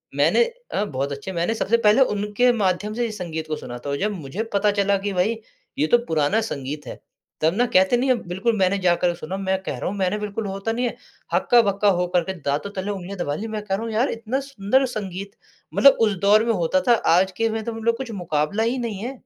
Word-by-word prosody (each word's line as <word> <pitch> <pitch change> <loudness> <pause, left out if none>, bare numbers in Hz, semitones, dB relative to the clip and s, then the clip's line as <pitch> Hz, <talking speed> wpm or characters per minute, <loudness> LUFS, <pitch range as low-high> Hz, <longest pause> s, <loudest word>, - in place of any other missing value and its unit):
मैंने 475 - +4 0.3
अ, 205 - 0
बहुत 140 -4 -3
अच्छे, 140 +7 -5
मैंने 175 +5 0
सबसे 235 +2 +2
पहले 210 +6 +6
उनके 210 +5 +2
माध्यम 205 0 0
से 240 +1 -1
ही 225 - -3
संगीत 165 -6 -5
को 155 - -2
सुना 120 - -7
था, - - -3
और 140 - -1
जब 210 +7 0
मुझे 175 +5 -5
पता 205 +1 +3
चला 200 0 +3
कि, 200 0 -3
"भई, 215 +5 +1 0.4
ये 155 - +3
तो 240 - +5
पुराना 160 +8 +1
संगीत 145 -7 -5
है।" - - -8 0.4
तब 160 +2 +3
ना, 245 +2 +3
कहते 190 +6 +5
नहीं 260 +2 0
हैं, 240 -8 +1
बिल्कुल, 215 +6 0
मैंने 190 +1 +2
जाकर 175 -1 +2
सुना। 175 +3 -6
मैं 190 -1 -1
कह - - -4
रहा - - -3
हूँ, 205 - -5
मैंने 190 +2 0
बिल्कुल, 210 +1 -4
वो 195 - -3
होता 195 +3 -3
नहीं 245 +2 -1
है, 235 - -2 0.4
हक्का-बक्का 205 -4 +3
हो 180 - +1
कर 175 - +4
के 190 - -4
दाँतों 145 +8 -1
तले 190 +2 -2
उँगलियाँ 195 0 -6
दबा 145 -4 -1
ली। 220 - -5
मैं 210 - -2
कह 195 - 0
रहा 220 - -4
हूँ, 225 - -4
"यार, 235 +5 +2
इतना 230 +4 -2
सुंदर 260 +3 +1
संगीत, 195 -1 -5 0.4
मतलब 275 -1 +6
उस 205 - 0
दौर 215 +2 +6
में 230 - +2
होता 185 -1 +1
था, 240 - +7 0.2
आज 190 +1 +3
के 225 0 +1
में 220 0 -3
तो 230 - -4
मतलब 230 +1 0
कुछ 250 -3 -6
मुकाबला 155 +8 0
ही 240 +3 0
नहीं 220 -4 -4
है।" 250 - -3
200 Hz, 245 wpm, -23 LUFS, 180-225 Hz, 0.4 s, था